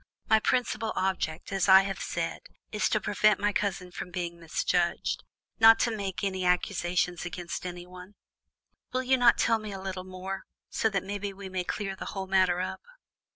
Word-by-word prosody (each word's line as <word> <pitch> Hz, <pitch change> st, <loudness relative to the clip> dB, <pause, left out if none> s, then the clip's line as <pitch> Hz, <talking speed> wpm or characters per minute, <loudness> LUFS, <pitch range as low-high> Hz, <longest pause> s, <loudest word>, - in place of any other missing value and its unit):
My 220 Hz, -, +5 dB
principal 225 Hz, -1 st, 0 dB
object, 185 Hz, -4 st, -2 dB
as 195 Hz, 0 st, +1 dB
I 190 Hz, 0 st, +9 dB
have 195 Hz, -1 st, -4 dB
said, 165 Hz, -1 st, -3 dB, 0.3 s
is 210 Hz, -, +1 dB
to 215 Hz, -, +2 dB
prevent 215 Hz, 0 st, +3 dB
my 205 Hz, 0 st, +1 dB
cousin 190 Hz, -3 st, -2 dB
from 180 Hz, -, -6 dB
being 170 Hz, -1 st, -4 dB
misjudged, 170 Hz, +1 st, 0 dB, 0.4 s
not 225 Hz, 0 st, +9 dB
to 230 Hz, -2 st, +1 dB
make 195 Hz, -3 st, -4 dB
any 190 Hz, -2 st, -1 dB
accusations 180 Hz, -1 st, 0 dB
against 175 Hz, +1 st, -5 dB
anyone; 180 Hz, +2 st, -9 dB, 0.8 s
will 255 Hz, 0 st, -1 dB
you 260 Hz, +1 st, +4 dB
not 245 Hz, -2 st, +5 dB
tell 225 Hz, -1 st, +3 dB
me 215 Hz, -1 st, -7 dB
a 195 Hz, -, -6 dB
little 190 Hz, -1 st, -5 dB
more, 185 Hz, +1 st, -6 dB, 0.2 s
so 220 Hz, -, +1 dB
that 195 Hz, -3 st, -1 dB
between 200 Hz, 0 st, -4 dB
us -, -, -20 dB
we 200 Hz, -1 st, -7 dB
may 185 Hz, -1 st, -2 dB
clear 195 Hz, +1 st, -3 dB
the -, -, -7 dB
whole 190 Hz, -, -2 dB
matter 185 Hz, -2 st, +3 dB
up?" 185 Hz, -, -3 dB
190 Hz, 185 wpm, -28 LUFS, 180-205 Hz, 0.8 s, I